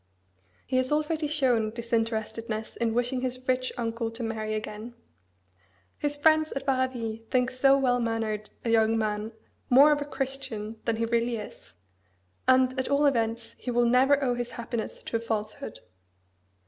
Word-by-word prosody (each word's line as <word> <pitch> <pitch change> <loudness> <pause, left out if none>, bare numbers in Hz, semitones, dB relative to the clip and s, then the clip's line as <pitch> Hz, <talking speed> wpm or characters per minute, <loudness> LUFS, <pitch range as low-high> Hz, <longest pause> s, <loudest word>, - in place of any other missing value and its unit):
He 255 - 0
has 255 +1 +1
already 305 +1 0
shown 255 -7 +2
disinterestedness 225 -1 -2
in 230 -1 0
wishing 245 +1 0
his 255 0 -4
rich 255 0 +1
uncle 230 -1 -2
to 230 +1 -6
marry 215 -1 -2
again. 215 +2 -6 1.0
His 290 0 -1
friends 310 +1 +4
at 275 0 -4
Varaville 255 -4 -1
think 255 0 +2
so 270 +2 +4
well 250 -2 +2
mannered 225 -2 -2 0.2
a 230 - +1
young 225 0 +4
man 215 0 -1 0.4
more 275 +4 +8
of 295 -1 +2
a - - -2
Christian 265 -6 -4
than 230 - +1
he 230 +1 0
really 235 +1 +1
is; 210 - -9 0.7
and, 260 0 +4
at 260 - -1
all 280 +1 +3
events, 230 -3 0
he - - -5
will 240 0 +3
never 265 +4 +4
owe 250 -2 +2
his 245 0 -3
happiness 235 -1 -5
to 230 - -1
a - - -5
falsehood. 225 +4 -4
240 Hz, 160 wpm, -27 LUFS, 225-260 Hz, 1.0 s, more